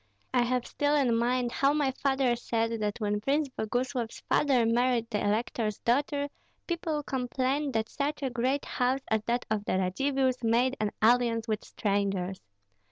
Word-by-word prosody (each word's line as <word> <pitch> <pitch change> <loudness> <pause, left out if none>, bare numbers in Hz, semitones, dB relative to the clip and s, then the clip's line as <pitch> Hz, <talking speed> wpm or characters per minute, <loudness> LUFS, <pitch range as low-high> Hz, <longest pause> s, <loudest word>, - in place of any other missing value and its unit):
I 250 - +4
have 250 0 0
still 290 0 0
in 260 -5 +3
mind 240 +1 +1
how 275 +3 +2
my 290 -3 +1
father 265 -2 +1
said 230 -1 -1
that 210 +1 -2
when 210 -1 -1
Prince 285 +4 +1
Boguslav's 245 0 -2
father 265 -5 +2
married 235 0 +2
the 210 - -1
elector's 215 0 0
daughter, 285 +4 0 0.4
people 320 -3 -2
complained 265 +2 -1
that 220 0 0
such 285 +3 -3
a 265 - -1
great 260 +4 0
house 255 +1 0
as 220 -1 +2
that 240 +1 0
of 210 -2 0
the - - 0
Radzivills 260 +7 0
made 240 +3 +2
an 215 - +1
alliance 230 -1 +3
with 215 -1 -1
strangers. 195 -3 -1
245 Hz, 165 wpm, -29 LUFS, 225-270 Hz, 0.4 s, I